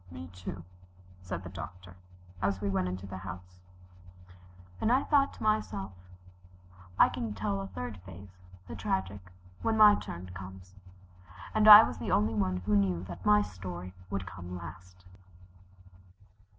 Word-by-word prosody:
"Me, 85 0 -8
too," 90 -1 -7 0.6
said 90 -1 -6
the 90 - -8
Doctor, 90 +1 -9 0.5
as 100 -1 0
we 100 0 -2
went 95 -1 0
into 95 +1 -5
the 95 -1 -7
house. 90 -1 -10 1.2
And 225 - +2
I 260 +2 +3
thought 280 -2 +3
to - - -10
myself, 110 - -1 1.1
"I - - +7
can 110 -3 -4
tell 100 -1 -2
a 95 - -5
third 90 +2 -6
phase 95 0 -13 0.3
the - - -7
tragic 95 -1 -3 0.3
when 220 0 0
my 210 -1 +9
turn 90 - -6
comes," 95 0 -10 0.8
and 215 0 +3
I 210 +1 +13
was - - -4
the - - -4
only 105 +2 +2
one 95 -4 -1
who 105 0 +2
knew 95 -4 +1
that 90 0 -8
my 105 0 +6
story 90 -1 -8 0.2
would 100 -1 -3
come 90 0 -8
last. 90 +1 -11
95 Hz, 150 wpm, -30 LUFS, 90-100 Hz, 1.2 s, I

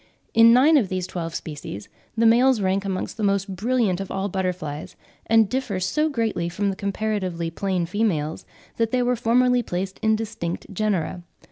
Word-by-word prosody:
In 230 0 +7
nine 280 +6 +6
of 215 -9 +1
these 185 -1 -2
twelve 165 -3 -5
species 145 - -7 0.3
the 230 - +3
males 245 +2 +5
rank 195 0 0
amongst 190 +1 -3
the 220 - -3
most 195 -1 0
brilliant 215 -2 +1
of 195 - -6
all 195 +1 -2
butterflies, 180 -6 -4 0.3
and 225 -1 +5
differ 250 -5 -2
so 300 +12 +1
greatly 225 - -1
from 200 +3 -1
the - - -5
comparatively 195 -4 -2
plain 185 0 -1
females 165 -5 -1 0.3
that 230 -1 +1
they 250 +1 +1
were 250 0 +1
formerly 245 +2 +3
placed 190 -2 -4
in 220 0 +3
distinct 215 -6 -4
genera. 185 -4 -1
200 Hz, 170 wpm, -23 LUFS, 180-230 Hz, 0.3 s, In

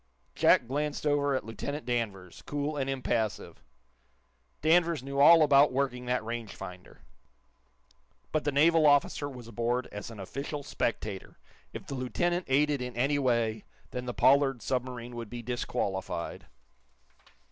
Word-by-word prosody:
Jack - - +4
glanced 150 +3 -2
over 145 -1 +2
at 130 - -3
Lieutenant 140 +6 -5
Danvers, 105 -7 -3
cool 145 +1 -2
and 135 -2 -2
impassive. 120 -5 -2 1.0
Danvers 165 -2 +3
knew 140 +1 -4
all 160 +3 +8
about 145 -1 +5
working 125 -2 -2
that 125 -3 0
range 115 -2 -5
finder. 90 0 -10 1.3
But 155 - 0
the 145 - 0
naval 155 +2 +5
officer 145 0 +2
was 125 -4 -10
aboard 120 +2 -1
as 105 +1 -7
an 115 -3 -10
official 140 +8 -5
spectator. 105 -7 -3 0.3
If - - -8
the - - -6
lieutenant 175 +8 -1
aided 145 +1 +2
in 125 -1 -5
any 140 +4 +2
way, 115 -5 0 0.3
then 125 0 -5
the 125 - -2
Pollard 135 -4 +3
submarine 125 -2 -3
would 115 -2 -6
be 120 +1 -7
disqualified. 100 -7 -3
130 Hz, 140 wpm, -29 LUFS, 115-145 Hz, 1.3 s, all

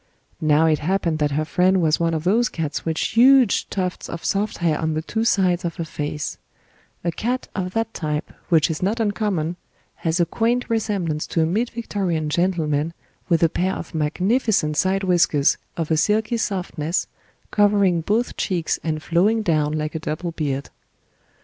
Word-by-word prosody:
Now 155 0 +4
it 155 -2 +3
happened 170 -1 0
that 150 -1 +2
her 155 - 0
friend 185 +4 +2
was 160 -2 +2
one 165 -1 +1
of 155 - -3
those 225 +7 +2
cats 155 -3 -3
with 160 -1 -2
huge 250 +1 +4
tufts 185 -2 -3
of 170 - -6
soft 205 +2 0
hair 165 -3 +1
on 160 -1 -1
the 155 - -2
two 220 +7 -2
sides 185 -5 +2
of 170 -1 -3
her 170 - -3
face; 150 -1 -4 0.6
a 170 - 0
cat 245 +9 -2
of 185 -2 -3
that 225 0 -1
type, 150 -1 -3 0.2
which 165 -2 +4
is 155 - -4
not 205 +5 0
uncommon, 200 -6 -1 0.4
has 165 +1 -1
a 175 - +4
quaint 235 +6 0
resemblance 195 -9 -1
to 165 - +1
a - - +2
Mid 215 +9 0
Victorian 190 -9 -2
gentleman 165 -2 0 0.3
with 170 -1 +3
a - - +7
pair 185 +4 -1
of 170 - -8
magnificent 180 - +1
side 190 +4 +1
whiskers 170 -6 +3 0.2
of 165 -1 -2
a 160 - +3
silky 215 +6 +1
softness 180 -6 -2 0.5
covering 200 -4 +3
both 220 +8 0
cheeks 175 -5 -1
and 155 -1 -2
flowing 205 +6 +2
down 155 -5 +1
like 155 0 -2
a 160 - -3
double 155 +3 -3
beard. 145 -4 -3
175 Hz, 175 wpm, -22 LUFS, 155-205 Hz, 0.6 s, a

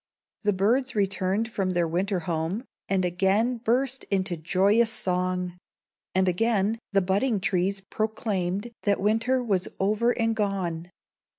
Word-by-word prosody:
The 210 - +2
birds 240 +7 +1
returned 195 +2 0
from 190 -4 -1
their 175 -1 +2
winter 185 +3 -1
home, 165 +6 -2 0.3
and 190 -2 +2
again 195 +7 +1
burst 255 +3 0
into 185 -3 0
joyous 195 +8 +3
song; 180 -3 -1 0.6
and 190 0 +3
again 215 +3 +1
the 195 -2 +3
budding 200 +5 +1
trees 195 +1 0
proclaimed 205 0 -2
that 200 -1 +1
winter 225 +5 +1
was 195 -6 0
over 215 +4 +2
and 225 -1 +1
gone. 185 -5 -2
195 Hz, 130 wpm, -26 LUFS, 185-225 Hz, 0.6 s, joyous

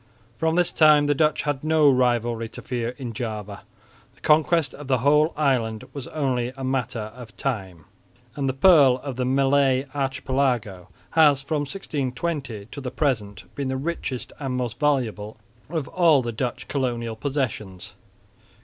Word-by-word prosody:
From 160 0 +1
this 175 -1 +2
time 150 -2 +5
the 145 - +3
Dutch 155 +2 +1
had 145 -2 -2
no 155 -1 +4
rivalry 120 -3 +2
to - - -11
fear 120 0 -3
in 125 -5 -6
Java. 105 -4 -5 0.5
The - - -26
conquest 155 -1 +3
of 145 -1 -10
the 130 -1 +2
whole 150 +5 +3
island 125 -6 0
was 140 -3 -6
only 130 -5 -1
a 130 +2 -8
question 130 -3 -1
of 110 +1 -10
time, 95 - -4 0.5
and 140 -2 -1
the - - -1
"pearl 140 -3 +6
of 140 -3 -5
the 125 0 -1
Malay 135 0 +3
Archipelago" 130 -8 -1 0.2
has 145 -4 +4
from 145 +1 -1
1620 135 - -4
to 140 - -7
the 130 - -4
present 110 -8 -2
been 140 -2 -3
the 130 0 -2
richest 140 -3 -4
and 135 -3 -3
most 120 -2 -3
valuable 120 -8 0 0.3
of 160 -5 -3
all 165 -7 +4
the 120 - -3
Dutch 120 +2 -4
colonial 120 -4 -2
possessions. 110 -8 -4
130 Hz, 160 wpm, -24 LUFS, 120-145 Hz, 0.5 s, pearl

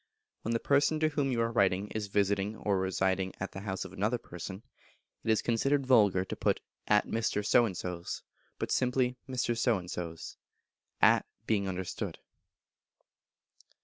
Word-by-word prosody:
When 115 - -2
the 115 - +1
person 140 +4 +3
to 155 - +4
whom 145 -3 0
you 120 - 0
are 115 0 +1
writing 100 -2 +2
is 110 -2 -3
visiting 100 +1 +1
or 100 -2 0
residing 95 0 0
at 95 - -4
the - - -7
house 95 -2 -4
of - - -10
another 110 +5 0
person, 95 0 -8 0.6
it - - -3
is 110 - +3
considered 135 +4 +1
vulgar 105 -7 +4
to - - -5
put - - +1 0.3
"at 105 0 +4
Mr. 110 -2 -1
So 120 +2 +5
and 95 -4 -5
So's," 90 -1 -5 0.3
but - - -3
simply 125 0 +2
"Mr. 125 -2 0
So 115 -1 +2
and 90 -1 -7
So's," 85 -2 -6 0.7
at - - +6 0.2
being 100 -4 +1
understood. 95 -1 -4
105 Hz, 165 wpm, -31 LUFS, 95-120 Hz, 0.7 s, at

